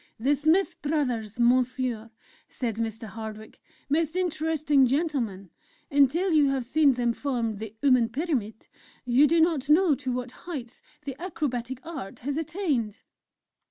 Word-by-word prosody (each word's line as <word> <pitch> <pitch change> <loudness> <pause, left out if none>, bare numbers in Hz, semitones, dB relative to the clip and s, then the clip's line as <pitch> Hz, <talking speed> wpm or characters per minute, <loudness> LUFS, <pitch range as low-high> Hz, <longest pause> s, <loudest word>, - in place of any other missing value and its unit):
"The 270 +6 +2
Smith 325 +6 +1
Brothers, 250 -8 -1
Monsieur," 245 -1 +1 0.4
said 230 -4 -3
Mr. 225 0 -3
Hardwick: 220 +1 -9 0.3
"most 315 +3 0
interesting 315 -5 +2
gentlemen! 245 - -1 0.4
Until 290 +7 +3
you 295 -3 +5
have 265 -3 -1
seen 290 +2 +4
them 240 -1 0
form 235 -6 -2
the 220 0 -7
'uman 255 -5 +4
Pyramid,' 250 -6 -3 0.4
you 250 +4 +5
do 335 +3 +3
not 320 -4 +2
know 325 +1 +5
to 255 -1 -3
what 250 0 -3
heights 255 -5 -8 0.2
the 275 -2 -4
Acrobatic 260 -7 -3
Art 290 -12 -7
has 280 +3 -3
attained!" 300 - -2
265 Hz, 135 wpm, -27 LUFS, 235-310 Hz, 0.4 s, you